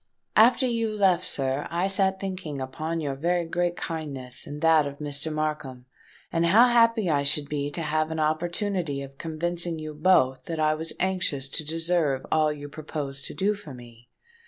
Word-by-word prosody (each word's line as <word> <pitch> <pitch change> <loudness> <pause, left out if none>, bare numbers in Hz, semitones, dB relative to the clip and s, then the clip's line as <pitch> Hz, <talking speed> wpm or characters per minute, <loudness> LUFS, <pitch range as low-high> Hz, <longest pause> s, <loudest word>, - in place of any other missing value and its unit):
"After 240 +4 +6
you 230 -2 0
left, 195 -4 +2
sir, 135 +1 -2
I 175 +3 0
sate 190 0 +1
thinking 185 -7 -5
upon 160 +5 -3
your 140 -3 -2
very 170 +5 0
great 175 +1 -1
kindness 140 -7 -5
and 145 0 -6
that 160 -3 +5
of 140 0 -7
Mr. 145 +1 -2
Markham, 150 -5 -3 0.5
and 170 0 +2
how 230 +8 +6
happy 230 -3 +4
I 145 -2 +2
should 140 +1 +2
be 145 -1 -2
to 165 +3 -3
have 155 +1 0
an 160 0 -3
opportunity 165 -1 -1
of 135 0 -12
convincing 170 +1 -2
you 155 -1 -6
both 150 -5 +3
that 165 -1 -4
I 155 0 +3
was 160 +1 -3
anxious 175 -8 0
to 155 - -1
deserve 165 -3 0
all 155 -1 +3
you 145 -1 -7
proposed 145 -2 -5
to - - -4
do 200 +2 +1
for 180 -10 -10
me. 120 -1 -15
155 Hz, 180 wpm, -26 LUFS, 145-175 Hz, 0.5 s, After